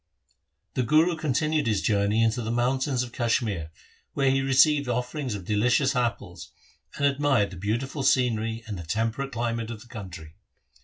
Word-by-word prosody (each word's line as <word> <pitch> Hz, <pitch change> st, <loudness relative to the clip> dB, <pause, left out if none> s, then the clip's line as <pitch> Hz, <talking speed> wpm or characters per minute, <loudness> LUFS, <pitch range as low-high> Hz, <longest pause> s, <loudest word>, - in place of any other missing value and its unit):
The -, -, 0 dB
Guru 155 Hz, +7 st, +3 dB
continued 155 Hz, -1 st, 0 dB
his 105 Hz, -3 st, +1 dB
journey 105 Hz, +1 st, +2 dB
into 115 Hz, +2 st, +1 dB
the 110 Hz, -, -4 dB
moun 120 Hz, +3 st, +1 dB
tains 130 Hz, -2 st, 0 dB
of 120 Hz, -, -8 dB
Kashmir, 115 Hz, -, -1 dB, 0.5 s
where 135 Hz, -1 st, +3 dB
he 135 Hz, 0 st, +2 dB
received 135 Hz, +1 st, +3 dB
offerings 125 Hz, 0 st, -2 dB
of 95 Hz, -3 st, -7 dB
delicious 120 Hz, +6 st, +2 dB
apples, 120 Hz, -2 st, -3 dB, 0.5 s
and 140 Hz, -, +1 dB
admired 140 Hz, -7 st, +2 dB
the 95 Hz, -, -9 dB
beautiful 120 Hz, -, -2 dB
scenery 115 Hz, -4 st, +1 dB
and 105 Hz, -5 st, -6 dB
the -, -, -6 dB
temperate 115 Hz, +10 st, -2 dB
climate 115 Hz, -2 st, -2 dB
of 110 Hz, -2 st, -7 dB
the -, -, -15 dB
country. 90 Hz, -9 st, -9 dB
120 Hz, 165 wpm, -26 LUFS, 110-135 Hz, 0.5 s, Guru